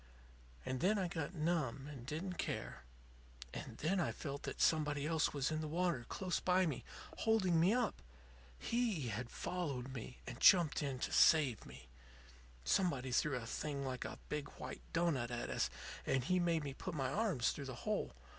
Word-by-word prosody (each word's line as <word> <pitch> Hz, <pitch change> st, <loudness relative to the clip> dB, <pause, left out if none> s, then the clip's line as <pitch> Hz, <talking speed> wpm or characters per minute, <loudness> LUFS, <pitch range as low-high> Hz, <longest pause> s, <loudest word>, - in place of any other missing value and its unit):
And 130 Hz, -, -2 dB
then 205 Hz, +8 st, +3 dB
I 190 Hz, -2 st, +1 dB
got 165 Hz, 0 st, -4 dB
numb, 150 Hz, -5 st, 0 dB
and 135 Hz, -5 st, -8 dB
didn't 170 Hz, +5 st, -4 dB
care. 65 Hz, 0 st, -3 dB, 0.7 s
And -, -, -6 dB
then 185 Hz, +5 st, +1 dB
I 175 Hz, -, +1 dB
felt 140 Hz, -1 st, -5 dB
that -, -, -8 dB
somebody 150 Hz, -2 st, +2 dB
else 160 Hz, -1 st, +2 dB
was 140 Hz, 0 st, 0 dB
in 155 Hz, 0 st, -1 dB
the 155 Hz, -, -3 dB
water 165 Hz, -6 st, 0 dB
close 185 Hz, -2 st, -1 dB
by 185 Hz, 0 st, +3 dB
me, 150 Hz, -7 st, -2 dB, 0.3 s
holding 195 Hz, -7 st, +3 dB
me 175 Hz, +4 st, +5 dB
up. 240 Hz, -2 st, +1 dB, 0.6 s
He 220 Hz, -, 0 dB
had 115 Hz, +3 st, -3 dB
followed 135 Hz, -8 st, -3 dB
me, 125 Hz, 0 st, -7 dB
and 120 Hz, 0 st, -7 dB
jumped 175 Hz, -6 st, +6 dB
in 140 Hz, -3 st, -2 dB
to -, -, -2 dB
save 145 Hz, -9 st, +5 dB
me. 65 Hz, 0 st, -12 dB, 0.8 s
"Somebody 135 Hz, -, +1 dB
threw 145 Hz, +3 st, +2 dB
a 120 Hz, -2 st, -3 dB
thing 140 Hz, +3 st, -3 dB
like 130 Hz, -1 st, -3 dB
a -, -, -6 dB
big, 150 Hz, -1 st, -3 dB
white -, -, -6 dB
doughnut 165 Hz, -8 st, +1 dB
at 120 Hz, -1 st, -3 dB
us, -, -, +1 dB, 0.3 s
and 135 Hz, -2 st, +1 dB
he 185 Hz, +6 st, +2 dB
made 170 Hz, -3 st, +2 dB
me 140 Hz, -2 st, -4 dB
put 180 Hz, +5 st, -5 dB
my 135 Hz, -3 st, 0 dB
arms 195 Hz, -, +2 dB
through 140 Hz, -, -6 dB
the 130 Hz, -2 st, -5 dB
hole. 215 Hz, -1 st, -1 dB
150 Hz, 185 wpm, -37 LUFS, 130-175 Hz, 0.8 s, jumped